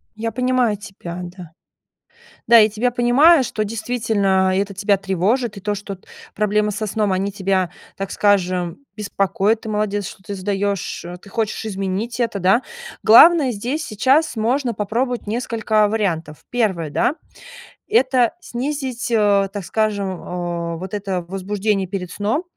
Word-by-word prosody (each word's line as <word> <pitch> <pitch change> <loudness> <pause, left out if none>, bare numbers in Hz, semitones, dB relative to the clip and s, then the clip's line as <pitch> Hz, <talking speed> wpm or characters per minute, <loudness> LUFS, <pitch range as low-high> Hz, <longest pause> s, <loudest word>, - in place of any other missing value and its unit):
Я 225 +1 -3
понимаю 250 -4 +1
тебя, 185 -3 -8
да. 175 -2 -10 1.0
Да, 235 0 +8
я 215 0 +5
тебя 230 +4 0
понимаю, 260 +6 +5
что 215 -2 -2
действительно 210 -4 0
это 200 0 -1
тебя 200 0 +2
тревожит, 200 +5 0
и 195 - -8
то, 210 +1 -1
что 205 0 -6
т 185 - -25 0.3
проблемы 210 0 +1
со 215 +2 -3
сном, 210 -1 0
они 195 +2 0
тебя, 190 -2 0 0.3
так 195 0 -4
скажем, 185 -4 +1 0.2
беспокоят. 205 +1 0
Ты 220 - -7
молодец, 210 -1 -1
что - - -11
ты 200 +1 -6
сдаешь, 200 0 -2
э, 175 +1 -7
ты 195 - -16
хочешь 220 0 -2
изменить 200 +3 -3
это, 230 -4 0
да. 190 +7 +4 0.4
Главное 295 +5 +7
здесь 245 +8 -3
сейчас, 265 +6 +2
можно 240 +2 0
попробовать 235 +4 -2
несколько 220 -1 +1
вариантов. 170 -8 -2
1, 190 -10 0
да, 165 - +1 0.7
это 260 - +3
снизить, 260 -4 -4
э, 200 -3 +3
так 205 -2 -4
скажем, 210 0 -1
о 170 -1 -4
вот 185 +2 -7
это 195 -3 -2
возбуждение 195 +1 -1
перед 180 -2 -5
сном. 220 - -1
210 Hz, 150 wpm, -20 LUFS, 190-230 Hz, 1.0 s, Да